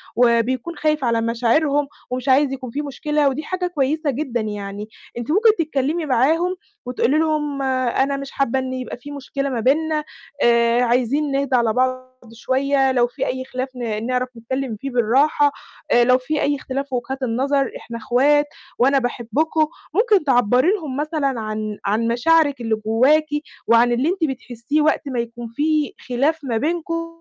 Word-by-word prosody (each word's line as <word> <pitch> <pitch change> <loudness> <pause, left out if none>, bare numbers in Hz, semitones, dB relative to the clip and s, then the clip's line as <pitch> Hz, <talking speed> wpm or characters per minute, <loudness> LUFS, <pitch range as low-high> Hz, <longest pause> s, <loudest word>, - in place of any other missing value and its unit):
وبيكون 245 +6 +2
خايف 305 -3 0
على 230 -1 +1
مشاعرهم، 275 +6 +1 0.2
ومش 255 +1 -3
عايز 270 +1 +4
يكون 255 -3 -6
في 290 - -2
مشكلة، 295 0 0
ودي 290 +4 -4
حاجة 365 +2 -2
كويسة 305 -1 -1
جدًا 250 -3 -2
يعني. 205 0 -5 0.3
أنتِ 240 +5 -3
ممكن 435 +5 +5
تتكلمي 310 +1 -1
معاهم 320 +8 +2 0.3
وتقولي 250 +3 +1
لهم 300 -3 0
أنا 265 +1 0
مش 275 0 -7
حابة 265 -1 0
إن 260 0 -4
يبقى 255 -1 -5
في 285 +4 -10
مشكلة 275 0 -4
ما 245 -3 -2
بيننا 305 +5 +1 0.4
آآ، 235 0 +4
عايزين 255 +4 +1
نهدا 275 -2 +1
على 230 -2 +2
بعض 255 0 0 0.3
شوية، 270 +3 +1
لو 245 -1 +3
في - - -4
أي 260 0 -3
خلاف 255 0 -4
ن 225 -3 -3
نعرَف 255 0 -1
نتكلم 260 +1 -3
فيه 275 +6 -6
بالراحة 275 +5 +3 0.4
آآ 240 - +5
لو 250 +1 +5
في 290 +4 -2
أي 285 0 +1
اختلاف 275 +1 -4
في 260 - -3
وجهات 260 +2 -4
النظر، 270 +3 0
إحنا 230 - -8
إخوات، 285 +6 +3 0.3
وأنا 270 +2 +4
باحبكم. 275 +6 0 0.3
ممكن 420 -3 +3
تعبَّري 250 - +3
لهم 310 -11 -3
مثلًا 295 -4 -1
عن 215 -1 -4
عن 220 +3 +1
مشاعرِك 285 +3 +2
اللي 225 -1 0
جواكِ، 265 +8 +4 0.4
وعن 235 +1 +5
اللي 255 +7 +1
أنتِ 365 -2 -2
بتحسيه 255 +3 -2
وقت 310 +1 +2
ما 250 -3 -2
يكون 235 0 -5
في 305 -1 +1 0.2
خلاف 285 +6 +1
ما 235 -4 -1
بينكم، 330 +3 -2
265 Hz, 170 wpm, -21 LUFS, 240-295 Hz, 0.4 s, ممكن